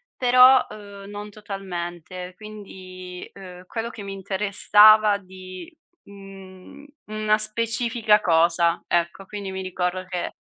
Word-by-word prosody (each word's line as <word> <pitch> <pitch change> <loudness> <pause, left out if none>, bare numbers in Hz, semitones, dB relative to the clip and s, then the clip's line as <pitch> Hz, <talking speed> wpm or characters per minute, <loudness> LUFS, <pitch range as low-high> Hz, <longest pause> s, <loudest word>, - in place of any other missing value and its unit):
però, 255 +1 +6
uhm, 200 -1 -11
non 205 0 -8
totalmente. 180 -3 -7
Quindi, 185 -3 -11
uhm, 185 -2 -12
quello 225 +4 -5
che 225 -3 -10
mi 195 0 -7
interessava 205 +2 +4
di, 185 - -12 0.3
mhmm, 195 +5 -14 0.2
una 215 0 0
specifica 225 0 +1
cosa, 170 0 +2
ecco. 175 +3 -1
Quindi 200 -1 -7
mi 190 0 -5
ricordo 185 0 -3
che 180 -1 -5
195 Hz, 115 wpm, -23 LUFS, 185-215 Hz, 0.3 s, però